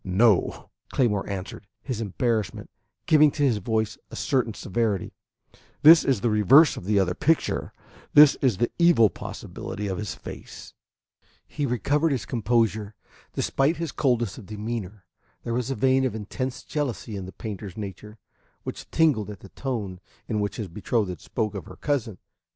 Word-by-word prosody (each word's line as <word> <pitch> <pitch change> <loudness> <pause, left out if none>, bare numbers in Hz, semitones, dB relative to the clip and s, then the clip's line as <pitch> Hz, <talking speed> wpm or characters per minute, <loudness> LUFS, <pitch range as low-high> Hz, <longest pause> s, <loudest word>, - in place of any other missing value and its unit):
"No," 95 +2 +2 0.2
Claymore 105 -7 0
answered, 100 +1 -6 0.2
his 125 -5 -3
embarrassment 110 +1 -2 0.3
giving 155 -1 +6
to 145 - -1
his 120 -7 +2
voice 110 +1 -1
a - - -9
certain 125 -5 0
severity. 105 -1 -1 0.7
"This 160 +2 +9
is 130 -7 +1
the 120 - +2
reverse 120 - +6
of - - -8
the 100 0 +2
other 90 -2 +1
picture. 160 - 0 0.4
This 150 -1 +9
is 125 -8 +2
the 120 - 0
evil 170 - +5
possibility 105 - -7
of 95 -2 -3
his 105 -1 -4
face." - - -10 0.7
He 145 -2 -2
recovered 145 +7 +1
his 125 -6 -3
composure. 110 -3 0 0.4
Despite 140 +5 +1
his 165 -3 -3
coldness 120 -6 0
of 100 - -12
demeanor, 105 -2 -5 0.4
there 115 - -3
was 125 +1 -1
a 135 - -1
vein 130 +3 +3
of 130 -4 -1
intense 125 +5 -4
jealousy 135 -7 -3
in 95 -2 -5
the - - -8
painter's 100 -3 -7
nature, 105 +1 -7 0.5
which - - -7
tingled 145 -11 +2
at 105 -3 -9
the 100 - -12
tone 105 -9 -4 0.3
in 110 -3 -1
which 100 -1 -2
his 110 -4 -4
betrothed 95 -1 -2
spoke 110 -3 -2
of 95 -6 -6
her - - -11
cousin. 120 -9 -2
110 Hz, 160 wpm, -25 LUFS, 100-130 Hz, 0.7 s, This